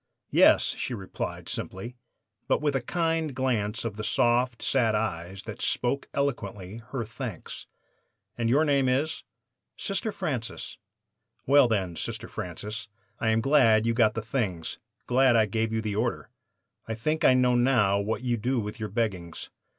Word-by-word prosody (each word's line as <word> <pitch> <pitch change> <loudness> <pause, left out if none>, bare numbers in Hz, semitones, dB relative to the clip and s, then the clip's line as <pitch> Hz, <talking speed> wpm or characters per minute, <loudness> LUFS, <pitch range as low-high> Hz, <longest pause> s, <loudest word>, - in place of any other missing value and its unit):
"'Yes,' - - +5
she 125 - -2
replied 95 -4 -5
simply, 115 +7 -6 0.5
but - - +2
with 145 -2 0
a 135 - +1
kind 165 +1 -1
glance 115 -5 -1
of 110 -2 -4
the 105 - -4
soft, 120 +2 +2
sad 115 -5 +2
eyes, 95 -3 -3
that - - -8
spoke 130 +3 0
eloquently 105 -8 -2
her 125 -3 -3
thanks. 110 - -7 0.7
"'And 115 -1 0
your 145 +6 +4
name 140 -3 +3
is 145 +5 0 0.3
" - - -58
"'Sister 210 +2 -2
Francis.' 135 - -4 0.7
"'Well, 140 -1 +6
then, 95 -6 -1
Sister - - -5
Francis, 105 +6 -5 0.3
I 110 - +1
am 110 0 +3
glad 115 -5 +4
you 115 - +2
got 110 -3 +3
the 115 - -3
things 105 -9 -3 0.3
glad 130 0 +4
I 110 -1 +5
gave 110 +2 -1
you 110 0 0
the 105 -2 -2
order. 115 +3 -2 0.6
I 115 - -2
think 155 +8 -1
I 130 - +6
know 125 -1 +4
now 120 -6 +3
what 110 +4 -2
you 120 -2 0
do 125 +3 0
with 105 +2 -5
your 110 -1 -3
beggings. 95 -8 -3
115 Hz, 165 wpm, -27 LUFS, 105-130 Hz, 0.7 s, Well